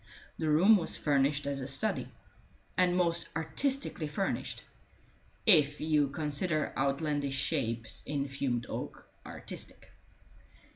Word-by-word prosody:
The 160 - 0
room 185 +9 +6
was 170 - -1
furnished 140 0 +2
as 140 -1 -2
a 130 - -4
study, 215 +11 0 0.7
and 180 -1 +3
most 170 -1 +2
artistically 175 - -1
furnished, 170 +6 -2 0.8
if 150 -8 +5
you 150 -2 +2
consider 150 +2 -1
outlandish 140 0 0
shapes 115 -6 -1
in 140 -1 -1
fumed 130 -3 -2
oak - - -6 0.2
artistic. - - -7
150 Hz, 110 wpm, -31 LUFS, 140-165 Hz, 0.8 s, room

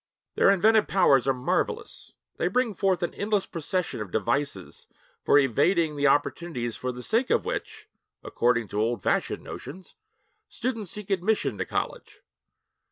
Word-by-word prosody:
Their - - +4
inventive 210 +3 +4
powers 140 -9 +4
are - - +5
marvelous; 125 - -3 0.2
they - - 0
bring 235 +4 +1
forth 190 -2 0
an 175 - -2
endless 205 -1 0
procession 170 - -3
of 105 - -5
devices 140 +9 -2 0.4
for - - +5
evading 150 - +2
the 145 0 +2
opportunities 135 -4 0
for 130 - -3
the 125 0 -8
sake 235 - +1
of - - +2
which 435 -1 -5 0.4
(according 120 -2 +1
to 105 - -1
old 115 -3 -1
fashioned - - 0
notions) 175 +8 -9 0.6
students 230 -7 -3
seek 210 +1 -6
admission 185 - +1
to - - -1
college. - - -4
170 Hz, 150 wpm, -26 LUFS, 125-200 Hz, 0.6 s, are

